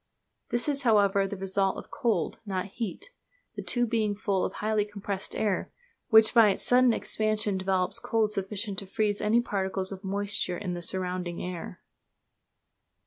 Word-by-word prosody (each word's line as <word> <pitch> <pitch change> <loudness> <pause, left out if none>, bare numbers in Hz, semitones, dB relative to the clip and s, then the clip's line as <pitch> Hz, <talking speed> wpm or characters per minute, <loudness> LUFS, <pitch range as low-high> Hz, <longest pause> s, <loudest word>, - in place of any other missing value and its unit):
This 240 +3 -1
is, 285 -1 0
however, 200 -4 +3
the 200 - -6
result 195 0 0
of - - -9
cold, 240 -6 -1
not 190 -3 -2
heat, 205 - -5 0.4
the - - -4
tube 240 -2 0
being 215 -3 +1
full 200 -2 0
of - - -2
highly 215 0 0
compressed 200 -1 -5
air, 205 -3 -1 0.4
which 220 -1 +7
by 230 -3 +7
its 195 - -2
sudden 250 0 +5
expansion 215 -2 0
develops 190 -1 0
cold 220 -2 +1
sufficient 200 0 -1
to 195 - -9
freeze 205 +1 0
any 215 +3 +3
particles 190 -3 -2
of 195 +1 -8
moisture 200 -2 -1
in 185 -2 -4
the 175 - -4
surrounding 180 -1 -3
air. 180 -2 -6
205 Hz, 160 wpm, -28 LUFS, 190-220 Hz, 0.4 s, which